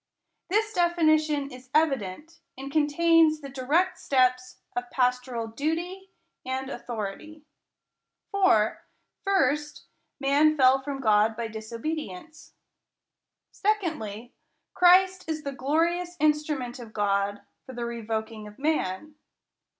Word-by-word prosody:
This 430 +3 +1
definition 310 -5 +2
is 255 0 -12
evi 305 -4 +4
dent, 260 - -9 0.2
and 270 +1 -7
contains 310 +1 +4
the 275 -2 -9
dii 260 -1 -8
ect 370 0 -6
steps 255 -1 +1 0.2
of 245 0 -3
pastoral 250 -2 0
duty 335 +11 -3 0.3
and 260 +1 -4
authority. 240 +8 -6 0.9
For, 375 - +3 0.4
first, 300 -7 0 0.4
man 290 +3 +3
fell 265 0 +5
from 275 0 -5
God 215 -1 +3
by 230 -1 -3
disobedi 230 +7 -4
ence. 310 - -13 1.0
Secondly, 305 - -2 0.4
Christ 370 0 +4
is 310 -1 -3
the 280 - -3
glorious 335 +6 0
instrument 300 -4 0
of 225 -2 -10
God 200 -1 0 0.2
for 260 - -8
the 240 -1 -4
revoking 220 -2 -4
of 210 - -13
man. 300 -3 -1
275 Hz, 115 wpm, -26 LUFS, 235-320 Hz, 1.0 s, fell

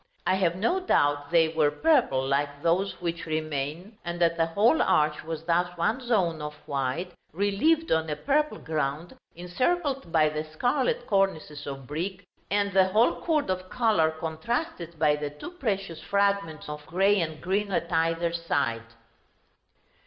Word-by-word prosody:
I - - +3
have 180 -3 +1
no 230 - +1
doubt 145 - +1
they 165 -1 +4
were 160 -2 +2
purple, 230 - +2
like 145 +1 -1
those 185 +4 +1
which 170 -1 -3
remain, 155 +6 -3
and 175 0 -4
that 170 -1 +3
the 165 -1 +1
whole 215 - +3
arch 150 0 +2
was 160 0 -5
thus 175 +1 0
one 215 +9 +1
zone 190 -10 0
of 150 0 -5
white, 140 +4 -2 0.2
relieved 205 - +1
on 160 0 +2
a 150 - -1
purple 295 - 0
ground, 155 +1 -3 0.2
encircled 260 - -1
by 155 -2 +4
the 155 0 -3
scarlet 245 - 0
cornices 190 -7 0
of 135 -1 -6
brick, 185 +7 -4 0.2
and 200 0 +1
the 190 -1 +5
whole 215 +5 +2
chord 305 - +1
of 185 0 -4
color 215 -10 +2
contrasted 170 - -4
by 150 -1 +3
the 150 0 -4
two 150 - -9
precious 195 - -3
fragments 200 -6 0
of 150 0 -6
grey 195 +3 +3
and 155 -2 -3
green 200 +3 -1
at 170 -2 -1
either 165 +1 +1
side. 130 -9 -2
170 Hz, 160 wpm, -27 LUFS, 155-200 Hz, 0.2 s, the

